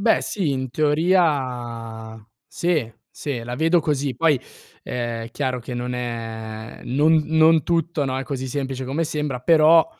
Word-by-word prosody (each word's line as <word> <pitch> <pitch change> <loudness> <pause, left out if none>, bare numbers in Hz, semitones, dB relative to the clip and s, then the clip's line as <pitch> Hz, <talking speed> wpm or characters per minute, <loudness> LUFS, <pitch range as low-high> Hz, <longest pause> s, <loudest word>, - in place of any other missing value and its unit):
Beh 220 +2 +4
sì, 185 -8 -1
in 130 -2 -2
teoria 130 -8 0 0.3
sì, 155 -11 -1 0.2
sì. 130 -6 -4
La 120 +1 -5
vedo 165 +2 +3
così. 140 -3 -1
Poi, 150 -1 +3 0.4
ehm, 120 -2 -3
è - - -8
chiaro 130 -2 -1
che 125 +1 -7
non 125 +1 -3
è 115 -2 -5
non 155 +4 +3
non 160 -1 +4
tutto, 165 -3 0
no, 130 -1 -1
è 135 - -2
così 130 -1 -4
semplice 135 -1 -3
come 140 +6 -1
sembra; 150 -5 -3
però, 160 +3 +6
135 Hz, 155 wpm, -22 LUFS, 120-160 Hz, 0.4 s, però